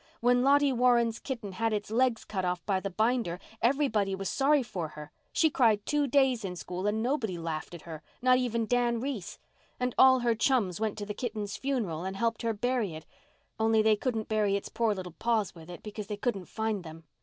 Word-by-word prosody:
When 245 +1 +3
Lottie 280 +1 +4
Warren's 240 -2 +3
kitten 235 -7 -5
had 225 +4 -1
its 210 0 -3
legs 245 0 +1
cut 190 -3 -3
off 180 -1 -2
by 195 -2 +1
the 195 - -4
binder 220 -2 0 0.2
everybody 230 -7 +2
was 195 0 -3
sorry 285 0 +3
for 185 -8 -4
her. 150 0 -10 0.2
She 320 -2 +3
cried 220 -6 +3
two 295 -1 +1
days 265 -4 +3
in 185 -2 -4
school 180 +2 -4
and 215 +2 0
nobody 240 -8 -1
laughed 165 0 -4
at 170 - -11
her, 160 -2 -8 0.2
not 255 0 +4
even 235 -2 0
Dan 240 0 +1
Reese. 245 -7 -4 0.4
And 250 -1 -1
all 260 -1 +7
her 240 -1 +2
chums 225 -6 +1
went 220 -1 -1
to 205 - -4
the 210 - -4
kitten's 210 -3 -4
funeral 220 - -2
and 190 +1 -4
helped 230 +3 -1
her 230 -1 0
bury 230 -5 -1
it—only 220 +7 -2
they 220 0 +5
couldn't 225 -1 -2
bury 210 -2 +1
its 200 - -3
poor 225 -3 +1
little 180 -3 -7
paws 225 -4 +1
with 165 -1 -13
it, 175 - -9
because 210 -1 -6
they 210 -1 -4
couldn't 205 -4 -2
find 220 -2 -2
them. 165 0 -10
220 Hz, 210 wpm, -29 LUFS, 195-245 Hz, 0.4 s, all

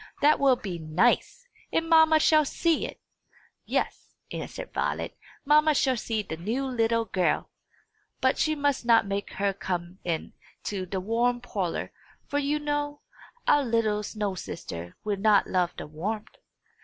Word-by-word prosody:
"That 300 +1 +5
will 275 -2 +5
be 190 -7 -6
nice! 190 - +1 0.2
And 330 - 0
mamma 320 -1 +6
shall 310 0 +5
see 325 +3 +1
it!" - - -11 0.7
"Yes," - - -2 0.2
answered - - -6
Violet; - - -2 0.3
"mamma 300 +1 +5
shall 265 -1 +3
see 220 -2 -2
the 160 -5 -6
new 225 +11 -2
little 230 -3 +1
girl. 185 -4 0 0.7
But - - +2
she 310 0 +2
must 285 -3 0
not 230 -2 +5
make 200 0 -3
her 200 0 0
come 180 -1 -4
into 185 +3 -5
the 190 +1 -2
warm 235 +5 +1
parlour; 200 -8 -3 0.3
for, 285 - -1
you 290 +1 +1
know, 290 0 -2 0.5
our 290 - +5
little 225 -4 +1
snow 210 -1 -3
sister 85 - -7
will 210 -2 -1
not 205 0 +4
love 180 -2 0
the - - -5
warmth." 200 +9 -5
225 Hz, 150 wpm, -27 LUFS, 190-285 Hz, 0.7 s, mamma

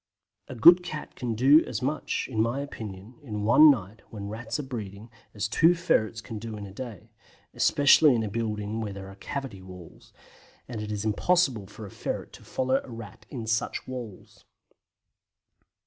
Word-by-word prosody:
A 130 - -8
good 170 +10 +8
cat 155 -4 -7
can 120 -3 -3
do 140 +7 +6
as 120 +1 -4
much, 145 +3 -2
in 110 -5 -1
my 120 +5 0
opinion, 110 -4 -8
in 105 -7 -5
one 120 +8 +8
night, 110 -5 0
when 100 -2 -7
Rats 110 +6 -4
are - - -3
breeding, 110 -4 -7 0.2
as 105 +1 -1
two 165 +9 +4
ferrets 110 -10 0
can 110 -1 -7
do 110 0 -6
in 100 - -7
a 95 - -11
day, 115 -4 -9 0.4
especially 145 0 +5
in 115 - 0
a - - -2
building 105 0 -3
where 105 -2 -4
there 95 0 -9
are - - -13
cavity 130 -3 -6
walls, 90 -3 -13 0.6
as 115 -3 -5
it 105 0 -5
is 105 0 -3
impossible 125 - +1
for 105 +2 -10
a 100 - -10
ferret - - -5
to - - -13
follow 130 +1 0
a - - -13
Rat 115 -4 -10
in 120 -5 -6
such 115 0 -1
walls. 120 -7 -9
115 Hz, 180 wpm, -27 LUFS, 105-130 Hz, 0.6 s, good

